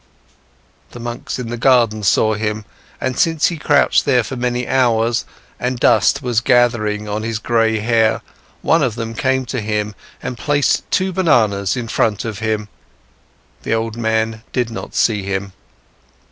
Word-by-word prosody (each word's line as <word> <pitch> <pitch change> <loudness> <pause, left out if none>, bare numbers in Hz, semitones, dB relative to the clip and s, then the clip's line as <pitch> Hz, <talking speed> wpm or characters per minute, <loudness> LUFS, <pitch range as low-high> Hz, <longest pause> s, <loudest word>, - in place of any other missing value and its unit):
The 120 - -9
monks 120 0 -5
in 125 -3 -5
the 120 - -4
garden 115 -4 +3
saw 110 +2 +3
him, 105 0 -3 0.3
and 130 0 -2
since 165 +3 +3
he 170 - -5
crouched 145 -2 +3 0.2
for 135 - -5
many 125 0 -2
hours, 120 -3 +2 0.3
and 125 0 -2
dust 140 - +3
was 120 -3 +1
gathering 115 -4 +2
on 105 +1 -2
his 115 0 -2
gray 115 0 +1
hair, 110 0 +1 0.4
one 165 - +3
of 125 -6 0
them 115 -1 -4
came 130 +2 0
to 125 0 -3
him 105 0 -2 0.3
and 125 - -5
placed 145 -1 +1
two 190 -1 0
bananas 110 - +2
in 120 -2 -4
front 110 -2 0
of 110 -3 -4
him. 110 -1 -2 0.9
The - - -1
old 115 0 -2
man 110 -1 -1
did 120 -3 -1
not 115 - -7
see 105 -3 +2
him. 95 0 -4
115 Hz, 160 wpm, -18 LUFS, 110-125 Hz, 0.9 s, garden